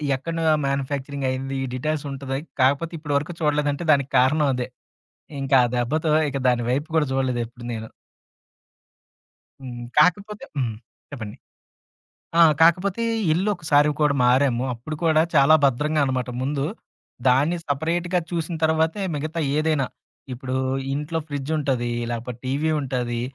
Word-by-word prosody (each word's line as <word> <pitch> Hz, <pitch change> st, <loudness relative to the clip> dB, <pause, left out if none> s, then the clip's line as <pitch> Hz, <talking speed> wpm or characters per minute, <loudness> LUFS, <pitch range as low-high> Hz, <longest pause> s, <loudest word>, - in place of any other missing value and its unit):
ఎక్కడను 165 Hz, +5 st, -4 dB, 0.2 s
మ్యాన్యుఫ్యాక్చరింగయింది. 135 Hz, -1 st, -2 dB
ఈ -, -, -1 dB
డీటైల్స్ 150 Hz, +3 st, -2 dB
ఉంటది. 135 Hz, 0 st, -4 dB, 0.2 s
కాకపోతే 140 Hz, +6 st, +2 dB
ఇప్పటి 150 Hz, -2 st, -2 dB
వరకు 150 Hz, +4 st, -3 dB
చూడలేదంటే 150 Hz, 0 st, 0 dB
దానికి 140 Hz, -1 st, 0 dB
కారణం 145 Hz, +4 st, +3 dB
అదే. 125 Hz, -1 st, -3 dB, 0.8 s
ఇంకా 135 Hz, 0 st, +4 dB
ఆ -, -, -3 dB
దెబ్బతో, 155 Hz, +6 st, 0 dB, 0.2 s
ఇక 140 Hz, -, -3 dB
దాని 120 Hz, -1 st, +2 dB
వైపు 145 Hz, +5 st, -1 dB
కూడా 155 Hz, -2 st, +3 dB
చూడలేదు 130 Hz, -2 st, 0 dB
ఎప్పుడు 120 Hz, +1 st, -12 dB
నేను. 110 Hz, -1 st, -5 dB, 1.7 s
హ్మ్. 120 Hz, -2 st, -7 dB, 0.2 s
కాకపోతే 205 Hz, +6 st, +2 dB
హ్మ్. 120 Hz, -5 st, -1 dB, 0.4 s
చెప్పండి. 110 Hz, -7 st, -7 dB, 1.0 s
ఆ! -, -, +8 dB, 0.2 s
కాకపోతే 180 Hz, +6 st, +3 dB, 0.3 s
ఇల్లు 190 Hz, +6 st, 0 dB
ఒకసారి 150 Hz, -4 st, +3 dB
కూడా 150 Hz, -1 st, +4 dB
మారాము. 125 Hz, -1 st, +3 dB
అప్పుడు 125 Hz, +7 st, -6 dB
కూడా 160 Hz, -1 st, +4 dB
చాలా 140 Hz, +2 st, +7 dB
భద్రంగా 150 Hz, +4 st, +1 dB
అనమాట 130 Hz, -2 st, -2 dB
ముందు. 140 Hz, +1 st, -1 dB, 0.6 s
దాన్ని 140 Hz, +7 st, +3 dB
సపరేట్‌‌గా 170 Hz, +5 st, 0 dB
చూసిన 170 Hz, 0 st, -2 dB
తరువాతే 160 Hz, +5 st, +1 dB
మిగతా 155 Hz, +3 st, -3 dB, 0.2 s
ఏదైనా. 155 Hz, -3 st, +1 dB, 0.5 s
ఇప్పుడు 130 Hz, +1 st, -4 dB, 0.4 s
ఇంట్లో 150 Hz, +3 st, -2 dB
ఫ్రిడ్జ్ 145 Hz, 0 st, -4 dB
ఉంటది. 130 Hz, -5 st, -1 dB, 0.2 s
లాకపోతే 120 Hz, 0 st, -5 dB
టీవీ 145 Hz, +4 st, 0 dB
ఉంటది. 125 Hz, -3 st, -2 dB
140 Hz, 130 wpm, -23 LUFS, 130-155 Hz, 1.7 s, ఆ